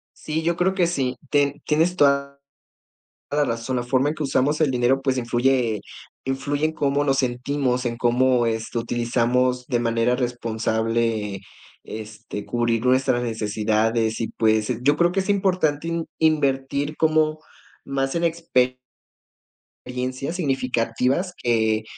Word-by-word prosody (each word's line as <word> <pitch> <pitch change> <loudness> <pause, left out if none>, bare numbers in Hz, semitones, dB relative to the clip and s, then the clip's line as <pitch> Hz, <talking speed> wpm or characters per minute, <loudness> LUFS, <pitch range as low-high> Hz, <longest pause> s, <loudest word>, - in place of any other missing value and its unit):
Sí, 160 +1 -3
yo 170 +1 +1
creo 185 +2 +1
que 180 -2 +3
sí. 130 -7 -1 0.2
Te 145 0 +1
tienes 165 +4 +2
toda 140 -2 +2 0.9
la 145 0 +2
razón, 115 0 -2
la 120 - 0
forma 130 +3 +1
en 150 - -1
que 155 - -5
usamos 145 +2 +1
el 155 -3 +3
dinero, 130 +2 +2
pues, 135 -1 0
influye 120 -2 +1 0.5
influye 140 +3 -1
en 155 - +1
cómo 145 -2 0
nos 135 -1 +1
sentimos, 125 0 0
en 120 -1 -2
cómo, 125 0 +3
este, 115 +1 -2
utilizamos 120 +2 0
de 120 - 0
manera 115 +1 +1
responsable, 115 -3 -1 0.4
este, 110 -1 -8
cubrir 120 -1 0
nuestras 130 -1 +2
necesidades 110 0 0
y, 115 - -2
pues, 110 +1 +1
yo 145 +3 +3
creo 175 +1 +3
que 195 - +1
es 190 - -5
importante 180 -6 +1
inv 170 -1 -2
invertir 145 -1 +1
como 155 -1 +2 0.4
más 135 -1 -2
en 170 0 0
expe 160 -7 +1 1.1
riencias 130 +6 -3
significativas 130 +3 0
que, 110 -2 +2
130 Hz, 140 wpm, -23 LUFS, 115-145 Hz, 1.1 s, que